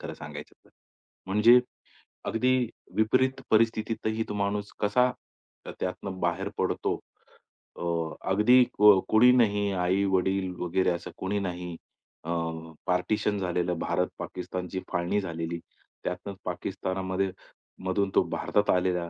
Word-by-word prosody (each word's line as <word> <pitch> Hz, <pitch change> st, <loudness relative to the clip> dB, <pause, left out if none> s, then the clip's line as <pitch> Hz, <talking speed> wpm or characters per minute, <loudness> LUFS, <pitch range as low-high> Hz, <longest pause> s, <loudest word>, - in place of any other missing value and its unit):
खरं -, -, -6 dB
सांगायचं 75 Hz, -1 st, -9 dB
तर. -, -, -24 dB, 0.6 s
म्हणजे 110 Hz, +5 st, +6 dB, 0.7 s
अगदी 130 Hz, +3 st, +2 dB, 0.4 s
विपरीत 130 Hz, +5 st, +2 dB
परिस्थितीतही 110 Hz, 0 st, +1 dB
तो -, -, -2 dB
माणूस 100 Hz, 0 st, -1 dB
कसा, 125 Hz, +5 st, +3 dB, 0.7 s
त्यातनं 95 Hz, +1 st, -4 dB
बाहेर 90 Hz, +3 st, -1 dB
पडतो, -, -, 0 dB, 0.8 s
अ, -, -, -7 dB, 0.5 s
अगदी 120 Hz, +6 st, +6 dB, 0.2 s
क 105 Hz, 0 st, +9 dB, 0.2 s
कुणी 120 Hz, +3 st, +7 dB
नाही, 105 Hz, -3 st, +2 dB
आई-वडील 95 Hz, 0 st, +1 dB
वगैरे, 90 Hz, +2 st, +1 dB
असं 85 Hz, -, -4 dB
कोणी 100 Hz, +2 st, -1 dB
नाही. 90 Hz, -3 st, -4 dB, 0.5 s
अ, 85 Hz, -, -7 dB, 0.6 s
पार्टिशन 105 Hz, +3 st, +1 dB
झालेलं 90 Hz, -2 st, -1 dB
भारत -, -, 0 dB
पाकिस्तानची 90 Hz, 0 st, -5 dB
फाळणी 90 Hz, +3 st, 0 dB
झालेली. 85 Hz, -2 st, -4 dB, 0.4 s
त्यातून 95 Hz, +2 st, -4 dB
पाकिस्तानमध्ये, 95 Hz, 0 st, -2 dB, 0.5 s
मधून 95 Hz, +1 st, +1 dB
तो -, -, +6 dB
भारतात 105 Hz, 0 st, 0 dB
आलेला, 90 Hz, -2 st, +1 dB
95 Hz, 115 wpm, -28 LUFS, 90-105 Hz, 0.8 s, क